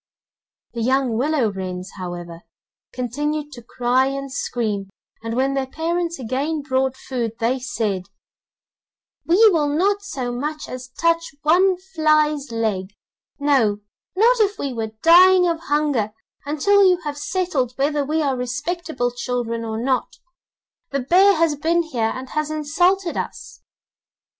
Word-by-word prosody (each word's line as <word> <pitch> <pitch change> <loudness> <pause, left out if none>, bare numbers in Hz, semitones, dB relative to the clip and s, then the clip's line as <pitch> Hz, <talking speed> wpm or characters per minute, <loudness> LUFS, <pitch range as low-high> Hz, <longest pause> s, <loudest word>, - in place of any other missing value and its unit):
The 235 - -4
young 260 0 +1
willow 260 -2 +1
wrens, 185 -1 -6
however, 175 -2 -7 0.5
continued 295 +5 -3
to 240 - -10
cry 245 +2 +1
and 275 0 -4
scream, 215 -7 -2 0.3
and 230 0 -4
when 265 +2 +1
their 270 -1 -1
parents 335 +3 -2
again 275 +5 -2
brought 265 -1 0
food 240 -5 -3
they 245 +3 0
said: 220 -9 -3 1.2
'We 415 +6 +6
will 310 -4 +2
not 385 +8 +1
so 260 -11 -4
much 300 +5 -4
as 255 0 -7
touch 335 -3 +1
one 360 +4 +4 0.2
fly's 305 -4 +2
leg, 210 -4 -2 0.4
no, 255 -8 +2 0.3
not 470 +5 +4
if 415 -1 +2
we 275 -2 -3
were 220 -2 -4
dying 360 +2 +7
of 335 -1 0
hunger, 290 -9 0 0.3
until 400 +8 +3
you 365 -2 +5
have 295 -2 -4
settled 300 -7 -1
whether 290 +1 +1
we 310 +3 0
are 275 -2 +1
respectable 255 +2 -2
children 240 -2 -3
or 220 -1 -4
not; 255 +2 -1 0.7
the 275 - -1
bear 380 +9 +5
has 330 -1 +2
been 335 +4 +1
here 235 -8 -1
and 260 0 -7
has 305 0 -1
insulted 340 +5 +1
us! - - -6
275 Hz, 140 wpm, -21 LUFS, 240-325 Hz, 1.2 s, dying